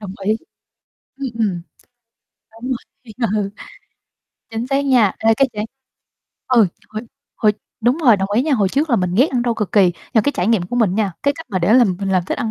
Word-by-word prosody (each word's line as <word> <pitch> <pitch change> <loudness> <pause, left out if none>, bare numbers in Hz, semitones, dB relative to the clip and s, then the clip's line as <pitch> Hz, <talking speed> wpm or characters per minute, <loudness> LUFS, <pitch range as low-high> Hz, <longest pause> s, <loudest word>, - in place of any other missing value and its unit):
Đồng 200 -3 -7
ý, 215 +2 +2 0.8
ừm, 275 -1 -4
ừm, 190 -6 0 0.9
đúng 240 +4 -7
rồi, 240 -2 -7 0.2
ờ. 205 -2 0 1.0
Chính 225 +2 -3
xác 275 +1 0
nha, 240 -8 +4
ê, 225 0 +3
cái 275 +2 +3
trải 210 +1 -3 0.8
ừ, 235 -6 +5 0.2
hồi 215 +1 -5 0.3
hồi 210 -2 +3 0.3
đúng 245 +5 +2
rồi, 230 -5 +7
đồng 195 +1 -2
ý 235 +5 +3
nha, 305 -1 0
hồi 200 -5 +2
trước 285 +6 0
là 235 - +4
mình 180 -1 -1
ghét 255 +9 +5
ăn 245 -2 0
rau 235 -1 +1
cực 210 -4 -3
kỳ, 205 - +5
nhưng 175 -1 +3 0.2
mà 220 - +6
cái 285 +6 0
trải 180 - -1
nghiệm 220 -6 +3
của 245 - -4
mình 205 -6 +2
nha, 205 -4 0
cái 285 0 +2
cách 325 - -9
mà 190 - 0
để 185 +6 +3
làm 215 -8 +4
mình 195 - -2
làm 185 -2 +2
thích - - -3
ăn 230 -5 -2
220 Hz, 225 wpm, -19 LUFS, 200-250 Hz, 1.0 s, rồi